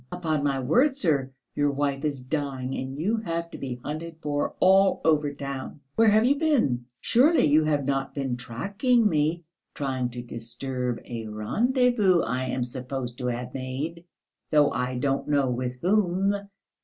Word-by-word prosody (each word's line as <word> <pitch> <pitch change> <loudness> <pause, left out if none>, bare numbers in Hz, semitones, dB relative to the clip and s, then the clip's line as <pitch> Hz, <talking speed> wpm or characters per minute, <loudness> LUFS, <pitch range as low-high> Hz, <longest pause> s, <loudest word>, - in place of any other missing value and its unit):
Upon 160 -5 -1
my 140 -2 +1
word, 250 - +3
sir; 150 - +1 0.2
your 145 0 +2
wife 140 -1 -1
is 140 -4 -2
dying 135 -2 -3
and 130 +1 -5
you 205 +9 0
have 170 -5 -3
to - - -8
be 130 -3 -4
hunted 160 +2 -5
for 145 -1 -1
all 190 +1 +5
over 150 -2 +3
the 145 - -10
town. 140 0 -6
Where 225 -1 +5
have 215 +2 +4
you 280 +3 +3
been? 230 - +2 0.2
Surely 290 - +4
you 155 +1 +4
have 145 -3 +1
not 135 -1 -1
been 135 -3 -1
tracking 200 - +1
me, 160 0 0 0.3
trying 130 -3 -2
to 120 0 -7
disturb 120 +1 -4
a 115 -2 -6
rendezvous 210 - +2
I 130 +2 -1
am 130 0 -1
supposed 125 0 -5
to 125 - -2
have 125 +1 -3
made, 135 +6 -4 0.5
though 150 -2 +4
I 125 0 -2
don't 135 +2 -1
know 140 -3 +2
with 125 0 -3
whom. 195 0 +2
145 Hz, 165 wpm, -26 LUFS, 130-175 Hz, 0.5 s, all